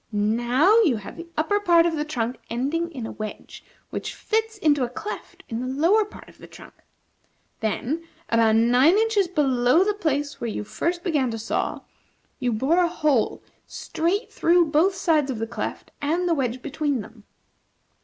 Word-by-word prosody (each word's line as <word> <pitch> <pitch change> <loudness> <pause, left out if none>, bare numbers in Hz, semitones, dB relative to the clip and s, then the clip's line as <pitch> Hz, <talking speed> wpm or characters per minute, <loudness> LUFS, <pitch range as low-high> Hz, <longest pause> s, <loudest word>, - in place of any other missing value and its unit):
Now 240 - +3
you 315 - +3
have 200 -1 -9
the 335 +1 -9
upper 365 +7 +1
part 345 -4 +4
of 335 -1 +1
the 300 - -1
trunk 250 -5 -3
ending 300 +8 -1
in 255 -7 -6
a - - -5
wedge, 215 -1 -8 0.3
which - - -5
fits 440 0 -1
into 295 -8 +2
a 245 - -1
cleft 415 - -7
in 225 - -4
the 255 - -3
lower 335 +12 +3
part 420 - -13
of - - -18
the - - -12
trunk. - - -14 0.9
Then, 265 +9 -2 0.2
about 225 -1 +3
nine 245 - +5
inches 435 -3 +2
below 275 -2 +3
the 420 +1 +1
place 295 -7 -2
where 235 - -2
you 210 - -4
first 345 +10 -2
began 295 -8 +1
to 225 - -4
saw, 225 +1 -2 0.6
you 245 - 0
bore 270 +10 +2
a 350 - +3
hole 300 -8 0 0.2
straight 375 +7 -2
through 340 -2 +3
both 345 +6 +3
sides 320 -7 +1
of 255 - -2
the 225 - -2
cleft 235 - -5
and 335 +5 0
the 340 - +3
wedge 255 -4 -2
between 285 -3 -1
them. 215 +1 -14
295 Hz, 180 wpm, -24 LUFS, 240-345 Hz, 0.9 s, nine